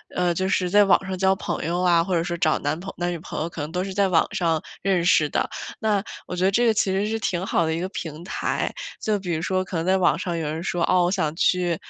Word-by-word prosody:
呃， 180 -1 +2
就 185 +3 -1
是 185 -1 +1
在 205 +3 +6
网 195 - +4
上 190 -1 -3
交 190 +1 +3
朋 185 -5 -4
友 175 +2 -1
啊， 175 -2 +4
或 185 +1 -3
者 165 -1 +2
说 175 0 -3
找 155 -2 +2
男 145 +3 -2 0.2
男 175 0 -1
女 175 - -3
朋 - - -6
友 160 - -1
啊， - - -7
可 165 - -7
能 150 - -5
都 180 +2 -1
是 195 - -5
在 200 0 +2
网 170 -3 +4
上 165 -3 +1 0.2
认 190 -3 +2
识 160 -3 +4
的， - - -1 0.3
那 210 -3 +1 0.2
我 - - -4
觉 180 +1 +1
得 195 - +4
这 240 +4 +3
个 225 - +4
其 205 -2 +1
实 195 +2 0
是 225 +1 -2
挺 185 -3 -1
好 170 - +1
的 160 - 0
一 165 - -2
个 185 +2 -3
平 160 -4 -6
台。 180 - -2 0.3
就 215 -1 +1
比 180 -3 -3
如 160 - -1
说 185 +2 0
可 185 - -7
能 165 - -1
在 190 +1 +3
网 180 -2 +3
上 175 -2 -2
有 160 - -2
人 155 +2 -3
说， 175 -2 -1
哦， 180 -1 +4
我 175 - +1
想 160 -5 -1
去 175 -1 +2
180 Hz, 315 characters per minute, -24 LUFS, 170-190 Hz, 0.3 s, 在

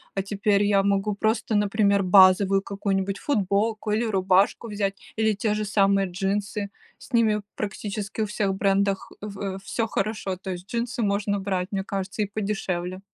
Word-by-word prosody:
А 195 - +1
теперь 200 +1 +1
я 200 -1 +3
могу 200 +1 +1
просто, 220 +1 0
например, 205 -1 +2
базовую 190 +1 +6
какую-нибудь 195 0 -2
футболку 215 -3 0
или 215 +3 +1
рубашку 190 +2 +2
взять 200 -2 -4
или 220 -1 +3
те 210 +1 0
же 210 0 -1
самые 195 -1 +2
джинсы. 200 +2 -2 0.3
С - - -16
ними 220 -3 +3
практически 205 0 -4
у - - +2
всех 205 -1 -1
брендах, 195 0 0
э, 210 - -5
в 195 -1 -5
всё 225 +3 -2
хорошо, 205 -2 -2
то 190 +1 -6
есть 180 +1 -7
джинсы 240 +2 -2
можно 200 -1 0
брать, 190 -2 -2
мне 195 -2 -1
кажется, 195 +1 -4
и - - +2
подешевле. 185 -4 -2
200 Hz, 165 wpm, -25 LUFS, 195-210 Hz, 0.3 s, базовую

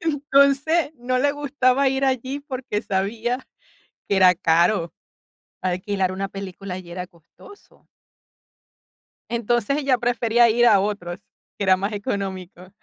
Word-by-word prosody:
Entonces, 290 0 +2
no 255 +1 -1
le 285 +2 +2
gustaba 275 -2 +1
ir 270 +1 0
allí 265 +2 -1
porque 255 -6 -4
sabía 225 +6 -2 0.6
que 200 - +1
era 185 -1 +6
caro 170 +1 +2 0.7
alquilar 185 +1 -1
una 195 +1 -3
película 195 -1 -7
allí 180 -1 -9
era 180 +1 -5
costoso. 175 - -19 1.4
Entonces, 240 +2 0
ella 275 -4 +1
prefería 240 -1 +2
ir 240 +2 +3
a 205 -4 +6
otros, 195 -2 -3 0.4
que - - -3
era 190 -1 +4
más 200 +3 -3
económico. 195 -3 -5
220 Hz, 125 wpm, -22 LUFS, 190-265 Hz, 1.4 s, era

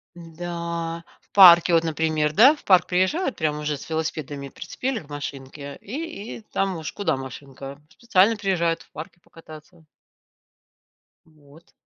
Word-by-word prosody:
Да, 170 0 -6 0.2
в - - -36
парке, 175 -3 +8
вот, 165 - +3
например, 155 -1 0
да. 255 - +7
В - - -20
парк 185 -2 +5
приезжают 190 - 0
прямо 150 -2 -1
уже 150 0 -2
с 140 - -11
велосипедами. 155 -3 -4
Прицепили 255 - -4
к 150 - -17
машинке 140 0 -7
и 270 -2 -7
и - - -13
там 195 -2 -1
уж 155 - -6
куда 165 -8 -1
машинка, 135 +1 -9
специально 225 -1 +2
приезжают 175 -5 0
в - - -26
парке 160 +3 -10
покататься. 160 0 -15 1.4
Вот. 155 +1 -21
165 Hz, 140 wpm, -23 LUFS, 150-185 Hz, 1.4 s, парке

